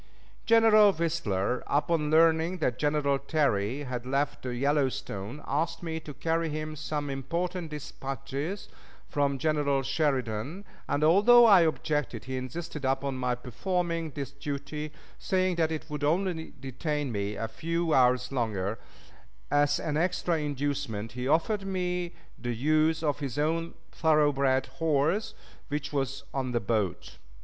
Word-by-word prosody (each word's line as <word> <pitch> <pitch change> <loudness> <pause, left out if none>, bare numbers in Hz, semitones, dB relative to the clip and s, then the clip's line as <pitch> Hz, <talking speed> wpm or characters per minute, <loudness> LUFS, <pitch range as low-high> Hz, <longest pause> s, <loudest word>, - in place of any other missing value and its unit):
General 220 -2 +7
Whistler, 125 - -1
upon 150 +1 +1
learning 165 +2 +4
that 125 -9 -1
General 145 -2 +1
Terry 140 -4 0
had 125 -3 -4
left 140 +3 -1
the 125 -1 -4
Yellowstone, 135 -3 -1
asked 160 +5 -1
me 160 -1 -3
to 155 - -9
carry 165 +3 0
to 150 - -4
him 155 0 -4
some 150 -1 -3
important 170 +6 -3
dispatches 140 +4 -5 0.4
from 140 -1 +1
General 145 -2 +1
Sheridan, 135 - -1 0.2
and 145 +1 +1
although 210 +9 +7
I 200 -5 +8
objected, 150 -6 0
he 130 0 -4
insisted 150 +4 -5
upon 135 +1 0
my 125 -1 0
performing 165 - -2
this 140 -2 -6
duty, 145 +2 -5 0.3
saying 185 -2 +1
that 160 -1 +2
it 155 -1 -4
would 150 -2 -5
only 165 +1 0
detain 145 +1 -3
me 100 -1 -2
a 115 - -3
few 165 +7 -1
hours 125 -1 +3
longer; 110 -5 -1 0.7
as 145 0 +3
an 150 -2 -2
extra 175 0 +1
inducement 140 -7 -2
he 125 +2 -4
offered 195 +8 +2
me 180 -2 -2 0.2
the 120 -1 -3
use 155 +5 +2
of 145 -2 0
his 140 -2 -4
own 165 +3 0 0.2
thoroughbred 145 -4 +3 0.2
horse, 160 +7 +1 0.3
which 145 0 -3
was 135 0 -2
on 130 -2 -2
the 120 - +2
boat. 105 -4 -2
145 Hz, 140 wpm, -28 LUFS, 130-165 Hz, 0.7 s, I